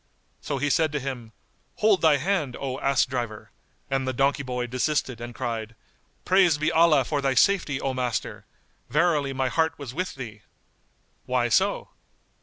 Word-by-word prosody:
So 140 - -3
he 145 +2 0
said 160 +3 +2
to 145 - 0
him, 125 -4 -6 0.4
"Hold 210 -3 +3
thy 155 -3 +5
hand, 155 -5 -1
O 130 -1 -4
ass 135 -1 +2
driver;" 120 -5 -5 0.4
and 135 -1 -1
the 130 - -1
donkey 140 +2 +1
boy 125 -2 -3
desisted 130 0 -1
and 120 0 -7
cried, 115 -3 -4 0.5
"Praised 185 -5 +4
be 155 +2 +1
Allah 160 -5 +4
for 145 0 -1
thy 135 -1 +1
safety, 165 -6 +2
O 135 -1 -2
master! 125 -3 -3 0.4
Verily 150 -1 +2
my 130 -1 -1
heart 160 +5 0
was 140 -4 -7
with 185 +5 -3
thee." 115 -6 -8 0.9
"Why - - +1
so?" - - +1
135 Hz, 165 wpm, -25 LUFS, 125-155 Hz, 0.9 s, thy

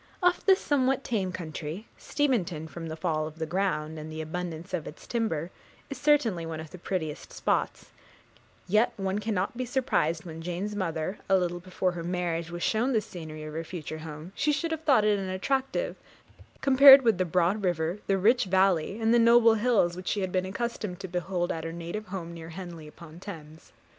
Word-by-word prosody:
Of 360 0 +3
this 380 -1 +6
somewhat 270 -2 +1
tame 195 -6 -1
country, 165 +2 -6
Steventon, 200 - -1
from 165 +2 -7
the 160 - -5
fall 155 -2 -1
of 155 0 -11
the 160 - -2
ground, 160 -3 -1
and 155 +1 -7
the 155 - -6
abundance 170 +2 -5
of 170 -4 -2
its 150 - -10
timber, 185 -8 -2 0.4
is 275 - -4
certainly 280 - +3
one 165 -1 -5
of 160 -1 -9
the 185 - -10
prettiest 160 -4 -4
spots; - - -1 0.8
yet 215 +5 +3
one 195 0 -1
cannot 205 -1 -1
be 255 - -2
surprised 240 - 0
that, - - -21
when 165 -1 -7
Jane's 180 +5 -3
mother, 175 0 -2
a 195 - +6
little 175 -1 -1
before 185 0 -1
her 175 -1 -6
marriage, 170 -1 -2
was 175 0 -5
shown 240 +5 +1
the 225 - +4
scenery 160 -6 -8
of 155 0 -7
her 165 +1 -3
future 155 -2 -6
home, 155 +2 -8
she 280 +6 +1
should 330 +3 -1
have 320 -1 -2
thought 265 -9 +4
it 210 -1 +3
unattractive, 260 - -1 0.7
compared 275 0 +9
with 225 -6 +3
the - - +4
broad 180 +4 +1
river, 175 +1 0
the 195 - +2
rich 230 +5 +4
valley, 190 +1 +2
and 225 0 +3
the 240 - +5
noble 230 0 +6
hills 215 -6 +2
which 185 0 -8
she 205 - 0
had 185 -1 -2
been 185 0 0
accustomed 210 -3 -4
to 195 - -5
behold 180 0 -2
at 160 - -4
her 165 - -4
native 170 +6 -6
home 180 -3 -6
near 165 -1 -9
Henley 170 -2 -8
upon 160 +1 -13
Thames. 160 -5 -10
185 Hz, 200 wpm, -28 LUFS, 165-220 Hz, 0.8 s, compared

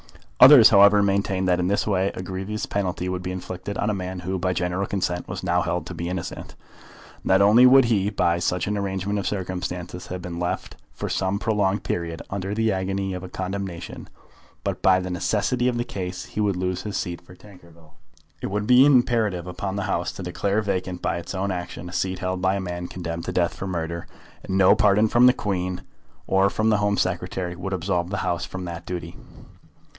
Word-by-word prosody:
Others, 130 -3 +10
however, 100 0 +7
maintained 95 -1 0
that 90 -1 +2
in 90 - 0
this 100 +2 +1
way 95 -2 +1
a 90 - -5
grievous 95 +3 -4
penalty 90 -2 -2
would 90 -1 -3
be 90 - -4
inflicted 95 +2 -6
on 105 - 0
a - - -1
man 90 -1 -5
who, 95 +1 -3
by 90 +1 0
general 90 +2 -1
consent, 90 -3 -2
was 90 +1 -6
now 90 -1 +2
held 90 -1 -2
to 90 - -7
be 85 0 -4
innocent. 90 -2 -6 0.7
Not 95 +1 +4
only 115 +5 +7
would 135 0 +7
he, 105 -4 +1
by 85 -4 +1
such 90 0 0
an 105 - -1
arrangement 100 0 -2
of 100 - -3
circumstances, 90 -2 -4
have 90 - -5
been 85 -1 -6
left 90 0 -3 0.2
for - - -5
some 95 +1 -1
prolonged 105 -2 0
period 85 -1 -3
under 100 +1 -3
the 110 0 +1
agony 95 0 -2
of 90 0 -6
a 95 - -7
condemnation, 95 -2 -5 0.5
but, - - -3
by 95 -1 +5
the 90 0 -4
necessity 110 +7 0
of 125 -1 0
the 120 - 0
case, 95 -5 -5
he 105 - -4
would 100 -2 +1
lose 90 0 -2
his 105 0 -4
seat 85 -2 -4
for 90 +1 -16
Tankerville. 85 -6 -18 0.5
It - - -2
would 105 +1 -2
be 125 +3 +7
imperative 120 -9 +3
upon 95 +2 -4
the 100 - -2
House 85 -3 -1
to 95 - -7
declare 100 +4 -1
vacant 95 -3 -3
by - - 0
its 85 +3 -7
own 95 +1 -1
action 90 -1 -5
a 90 - -9
seat 95 -1 -1
held 90 0 -3
by 95 +1 +2
a - - -1
man 90 -1 -4
condemned 85 -2 -5
to - - -3
death 85 -1 +1
for 95 - -6
murder, 85 -2 -4 0.4
and 95 0 -2
no 95 0 +6
pardon 105 0 +4
from 120 +3 +5
the 125 - +6
Queen 90 -5 -3 0.4
or 95 +1 +3
from 110 +2 +1
the 105 - +3
Home 105 -1 +1
Secretary 90 0 -2
would 95 +2 -5
absolve 90 -1 -1
the 100 - -3
House 85 0 -1
from 95 -1 -6
that 85 0 -7
duty. 85 -1 -5
95 Hz, 210 wpm, -24 LUFS, 90-100 Hz, 0.7 s, Others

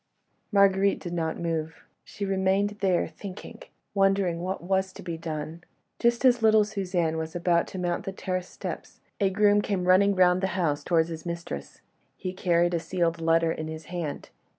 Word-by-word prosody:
Marguerite 200 -1 +4
did 175 -2 -6
not 160 -2 -1
move, 160 -1 -3 0.2
she 200 - -6
remained 195 +1 +1
there, 185 -3 +2
thinking... 200 -1 -10 0.3
wondering 195 -3 +2
what 185 0 -3
was 190 +1 0
to 200 - -11
be 170 -2 -4
done. 160 +1 -6 0.4
Just 235 +2 +2
as 245 -2 +5
little 220 -1 +5
Suzanne 180 -6 -1
was 160 +1 -4
about 170 -1 +2
to - - -8
mount 175 -1 -2
the 195 - -3
terrace 185 -1 -3
steps, - - -7 0.2
a 200 -2 +3
groom 205 +1 +4
came 190 -3 -2
running 200 +2 +5
round 180 0 +4
the 190 - +1
house 150 -5 0
towards 165 -1 +2
his 160 -1 -6
mistress. 170 - -6 0.4
He 185 - -4
carried 175 -1 +2
a 170 - +1
sealed 170 -1 -1
letter 165 0 +3
in 155 -1 -4
his 160 0 -7
hand. 165 -5 -4
180 Hz, 175 wpm, -27 LUFS, 165-195 Hz, 0.4 s, as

